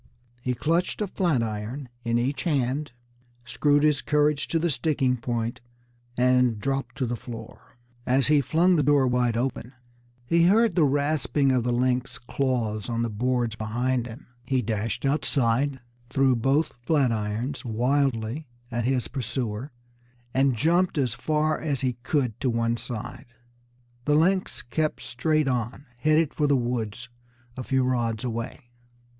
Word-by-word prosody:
He 125 Hz, 0 st, -1 dB
clutched 165 Hz, +8 st, 0 dB
a 210 Hz, -, 0 dB
flat 175 Hz, -10 st, +1 dB
iron 110 Hz, +5 st, -4 dB, 0.2 s
in 115 Hz, 0 st, +1 dB
each 130 Hz, +3 st, -1 dB
hand, 145 Hz, -2 st, 0 dB, 0.5 s
screwed 145 Hz, +4 st, +2 dB
his 150 Hz, -3 st, +3 dB
courage 150 Hz, -1 st, +1 dB
to 165 Hz, -, 0 dB
the 165 Hz, 0 st, +1 dB
sticking 130 Hz, -1 st, +1 dB
point, 115 Hz, -1 st, -3 dB, 0.6 s
and 125 Hz, -2 st, +3 dB
dropped 135 Hz, -1 st, -2 dB
to 130 Hz, -, -1 dB
the 120 Hz, 0 st, -2 dB
floor. 115 Hz, 0 st, -10 dB, 0.3 s
As 130 Hz, +1 st, +2 dB
he 150 Hz, -1 st, +4 dB
flung 170 Hz, +6 st, +3 dB
the -, -, +3 dB
door 145 Hz, -1 st, +4 dB
wide 125 Hz, -2 st, +1 dB
open, 125 Hz, 0 st, -3 dB, 0.5 s
he 170 Hz, +6 st, +3 dB
heard 220 Hz, +3 st, +4 dB
the 165 Hz, -3 st, +4 dB
rasping 145 Hz, 0 st, +1 dB
of 125 Hz, -2 st, +2 dB
the 120 Hz, -, 0 dB
lynx's 125 Hz, +1 st, 0 dB
claws 120 Hz, -4 st, -2 dB
on 115 Hz, 0 st, 0 dB
the 115 Hz, -, -2 dB
boards 120 Hz, +1 st, 0 dB
behind 120 Hz, +3 st, -1 dB
him. 115 Hz, 0 st, -10 dB, 0.2 s
He 130 Hz, 0 st, 0 dB
dashed 110 Hz, +3 st, -2 dB
outside, 135 Hz, -1 st, +1 dB, 0.3 s
threw 135 Hz, -1 st, +3 dB
both 135 Hz, +7 st, +1 dB
flat 135 Hz, -1 st, +2 dB
irons 110 Hz, +6 st, -2 dB
wildly 125 Hz, +2 st, 0 dB, 0.2 s
at 120 Hz, 0 st, -1 dB
his 130 Hz, -1 st, +1 dB
pursuer, 120 Hz, 0 st, -3 dB, 0.6 s
and 135 Hz, -1 st, +3 dB
jumped 170 Hz, +6 st, +2 dB
as 130 Hz, -5 st, +1 dB
far 155 Hz, +4 st, 0 dB
as 145 Hz, -4 st, -1 dB
he 130 Hz, -2 st, 0 dB
could 125 Hz, -4 st, -1 dB
to 130 Hz, -, 0 dB
one 115 Hz, 0 st, +1 dB
side. 120 Hz, +2 st, -6 dB, 0.8 s
The 150 Hz, -, +3 dB
lynx 185 Hz, +4 st, +1 dB
kept 155 Hz, +5 st, -2 dB
straight 155 Hz, +3 st, 0 dB
on, 125 Hz, +2 st, -2 dB
headed 155 Hz, +2 st, +2 dB
for 150 Hz, -, +1 dB
the 140 Hz, -1 st, +4 dB
woods 120 Hz, -2 st, -3 dB, 0.5 s
a 130 Hz, -, -5 dB
few 130 Hz, +1 st, +1 dB
rods 120 Hz, -3 st, 0 dB
away. 120 Hz, +1 st, -5 dB
130 Hz, 150 wpm, -26 LUFS, 120-145 Hz, 0.8 s, he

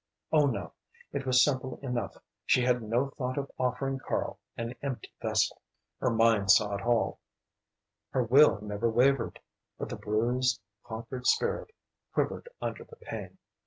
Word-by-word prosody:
Oh 150 Hz, -2 st, +5 dB
no 130 Hz, -, -3 dB, 0.4 s
it 135 Hz, -1 st, -3 dB
was 125 Hz, 0 st, +6 dB
simple 130 Hz, -3 st, 0 dB
enough; 120 Hz, -7 st, -3 dB, 0.3 s
she 125 Hz, -, +3 dB
had 125 Hz, 0 st, +2 dB
no 120 Hz, +5 st, 0 dB
thought 130 Hz, -2 st, -3 dB
of 140 Hz, -1 st, -3 dB
offering 130 Hz, +2 st, 0 dB
Karl -, -, -2 dB, 0.2 s
an 115 Hz, +1 st, -3 dB
empty 135 Hz, -3 st, -5 dB
vessel. -, -, +1 dB, 0.4 s
Her 125 Hz, -, +2 dB
mind 115 Hz, -3 st, +3 dB
saw 105 Hz, +1 st, +6 dB
it 100 Hz, -, -2 dB
all, 120 Hz, +1 st, +1 dB, 0.9 s
her 130 Hz, -, +1 dB
will 130 Hz, 0 st, +6 dB
never 105 Hz, +2 st, -1 dB
wavered, 125 Hz, +1 st, +2 dB, 0.4 s
but -, -, -4 dB
the -, -, -4 dB
bruised, 120 Hz, +4 st, +1 dB, 0.2 s
conquered 120 Hz, +3 st, -5 dB
spirit 470 Hz, -1 st, +2 dB, 0.5 s
quivered 480 Hz, -, -1 dB
under -, -, -4 dB
the 465 Hz, -, -15 dB
pain. -, -, -7 dB
125 Hz, 150 wpm, -30 LUFS, 115-135 Hz, 0.9 s, was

